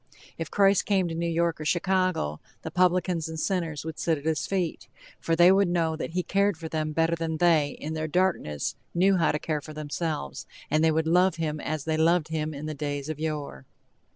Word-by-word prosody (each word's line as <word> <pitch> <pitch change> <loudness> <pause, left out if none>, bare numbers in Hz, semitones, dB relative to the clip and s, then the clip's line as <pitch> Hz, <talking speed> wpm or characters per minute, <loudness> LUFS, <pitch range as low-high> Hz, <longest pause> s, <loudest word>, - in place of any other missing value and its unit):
If 165 -3 -5
Christ 195 +1 +3
came 190 -3 +2
to - - -4
New 170 +1 -1
York 170 -1 0
or - - -3
Chicago, 180 - 0 0.2
the - - -5
publicans 180 -2 +1
and 160 0 -5
sinners 165 -5 -2
would 160 - -6
sit 165 -2 +1
at 145 - -11
his 160 -1 0
feet! 180 -8 -2 0.3
For 165 - 0
they 175 +2 +7
would 195 0 +4
know 165 -2 +1
that 160 - -5
he 180 0 0
cared 200 -1 +1
for 160 0 -6
them 155 -1 -2
better 165 +2 +1
than 165 -1 -3
they 155 -4 +3
in 155 +2 -4
their 155 0 -2
darkness 155 - 0 0.2
knew 190 +2 +4
how 165 - +3
to 150 - -1
care 150 -1 -2
for 155 +1 -10
themselves, 150 - -4 0.2
and 155 +1 +3
they 160 - +5
would 160 0 +1
love 180 +2 +3
him 155 -2 -2
as 155 0 -3
they 160 0 -1
loved 165 0 +3
him 155 -1 -2
in 145 0 -7
the 155 - -3
days 145 0 -4
of 155 -1 -4
yore. 150 - -4
160 Hz, 220 wpm, -27 LUFS, 155-175 Hz, 0.3 s, they